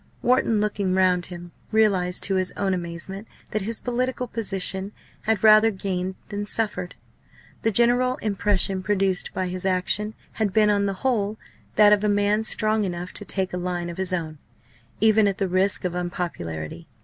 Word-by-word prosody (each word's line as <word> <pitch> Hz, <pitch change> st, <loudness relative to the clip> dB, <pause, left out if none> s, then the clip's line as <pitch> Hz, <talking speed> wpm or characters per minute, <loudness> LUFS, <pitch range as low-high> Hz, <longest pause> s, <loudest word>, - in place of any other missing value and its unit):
Wharton, 245 Hz, -3 st, +3 dB
looking 200 Hz, -3 st, 0 dB
round 180 Hz, -2 st, +2 dB
him, 175 Hz, -1 st, -9 dB, 0.2 s
realised 195 Hz, -5 st, +2 dB
to 195 Hz, -, 0 dB
his 185 Hz, -1 st, 0 dB
own 195 Hz, -1 st, -1 dB
amazement 180 Hz, +4 st, -5 dB, 0.2 s
that 215 Hz, -, 0 dB
his 220 Hz, +3 st, -2 dB
political 250 Hz, +1 st, -2 dB
position 195 Hz, -3 st, -2 dB, 0.3 s
had 220 Hz, -2 st, +1 dB
rather 215 Hz, +1 st, +7 dB
gained 190 Hz, -2 st, -3 dB
than 205 Hz, 0 st, -4 dB
suffered. 210 Hz, -5 st, 0 dB, 0.7 s
The 225 Hz, -, +2 dB
general 245 Hz, +3 st, +3 dB
impression 200 Hz, -3 st, 0 dB
produced 195 Hz, -2 st, 0 dB
by 185 Hz, -, -2 dB
his 185 Hz, 0 st, -5 dB
action 190 Hz, +3 st, 0 dB, 0.2 s
had 210 Hz, -4 st, -1 dB
been 210 Hz, 0 st, +4 dB
on 200 Hz, -1 st, +1 dB
the 195 Hz, -, -1 dB
whole 215 Hz, -4 st, +1 dB, 0.4 s
that 210 Hz, 0 st, +7 dB
of 210 Hz, 0 st, +2 dB
a 210 Hz, -, +2 dB
man 205 Hz, +1 st, +2 dB
strong 215 Hz, 0 st, +2 dB
enough 175 Hz, -1 st, -4 dB
to 205 Hz, -, -3 dB
take 190 Hz, 0 st, -2 dB
a -, -, -1 dB
line 175 Hz, -1 st, -3 dB
of 170 Hz, -, -10 dB
his 190 Hz, 0 st, -1 dB
own, 160 Hz, -4 st, -3 dB, 0.6 s
even 220 Hz, 0 st, +4 dB
at 195 Hz, -1 st, -1 dB
the 195 Hz, -, 0 dB
risk 185 Hz, +1 st, +1 dB
of 180 Hz, -, -1 dB
unpopularity. 170 Hz, -, -4 dB
195 Hz, 175 wpm, -24 LUFS, 180-215 Hz, 0.7 s, rather